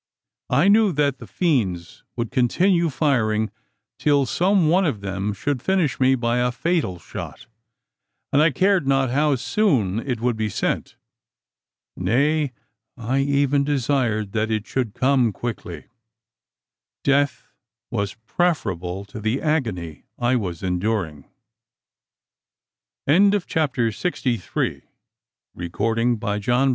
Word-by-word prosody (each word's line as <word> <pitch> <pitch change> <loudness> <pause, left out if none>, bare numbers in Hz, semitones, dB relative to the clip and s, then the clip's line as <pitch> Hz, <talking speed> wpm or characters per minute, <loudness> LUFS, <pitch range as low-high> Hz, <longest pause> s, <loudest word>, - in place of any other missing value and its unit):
I - - +3
knew 210 0 +5
that 140 -2 +1
the - - -10
fiends 100 - -1
would 115 -2 -3
continue 170 +7 +2
firing, 110 -8 +1 0.5
till 145 -2 +3
some 180 +4 +2
one 180 +5 +4
of 140 - -1
them 100 +1 -2
should 130 +5 -2
finish 185 -3 0
me 130 0 +4
by 120 -1 0
a 125 0 +1
fatal 150 - -1
shot; 85 - -8 0.9
and 145 - +5
I 160 - +5
cared 185 +1 +2
not 135 -2 +2
how 145 +2 +2
soon 125 - +1
it 125 0 -3
should 120 -1 0
be 110 -1 -1
sent. - - -2 1.0
Nay, 140 +9 +1 0.5
I 125 +3 -1
even 140 0 +2
desired 125 -7 0
that 110 +1 -1
it 110 -1 -1
should 125 -6 -2
come 130 -3 +3
quickly. 120 +3 -6 1.2
Death 140 +1 +1 0.4
was 100 -4 -2
preferable 100 - -1
to 110 +2 -9
the 110 +5 -1
agony 110 - -2
I 120 +1 +1
was 90 -8 -3
enduring. 90 -5 -2 1.8
CHAPTER 160 - +2
SIXTY 125 - -1
FOUR. - - -2
A - - -6 0.9
HUNDRED 115 +5 0
DEATHS. 105 +6 +1
125 Hz, 120 wpm, -22 LUFS, 110-145 Hz, 1.8 s, knew